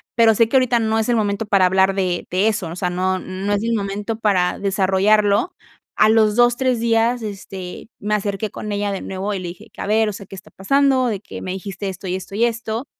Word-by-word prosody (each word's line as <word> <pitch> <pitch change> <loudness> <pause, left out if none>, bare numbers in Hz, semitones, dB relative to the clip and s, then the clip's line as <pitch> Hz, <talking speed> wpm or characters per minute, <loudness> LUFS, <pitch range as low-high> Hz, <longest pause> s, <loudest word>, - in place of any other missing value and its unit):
pero 225 -2 +5
sé 230 +1 +4
que 265 - +4
ahorita 250 -2 +3
no 220 0 +1
es 220 - 0
el 240 - +3
momento 210 0 0
para 195 -3 +3
hablar 190 +1 +3
de 180 -3 -1
de 190 +4 +1
eso, 210 -5 -2
o 165 - -7
sea, 180 0 -1
no 185 +1 0
no 190 +3 -3
es 205 +1 0
el 230 0 0
momento 205 +1 -3
para 190 -5 +1
desarrollarlo", 200 - +2 0.4
a - - +5
los 220 -1 +4
2 240 0 +4
3 255 -3 +1
días, 235 +1 +2
este, 195 -3 -7
me 210 +1 0
acerqué 205 0 -2
con 210 - -6
ella 205 0 -1
de 195 - -3
nuevo 195 +2 -4
y 195 - -3
le 180 - -6
dije 170 0 -10
que: - - -9
"A - - -4
ver, 220 0 +2
o - - -4
sea, 200 - -9
¿qué 195 - -11
está 185 - -13
pasando?, 265 +5 +2
de 210 -4 -2
que - - -9
me 185 - -4
dijiste 195 +1 -5
esto, 190 +1 -8
y 180 - -1
esto, 190 +1 -7
y 230 - +1
esto". 230 +1 -3
205 Hz, 250 wpm, -20 LUFS, 190-225 Hz, 0.4 s, pero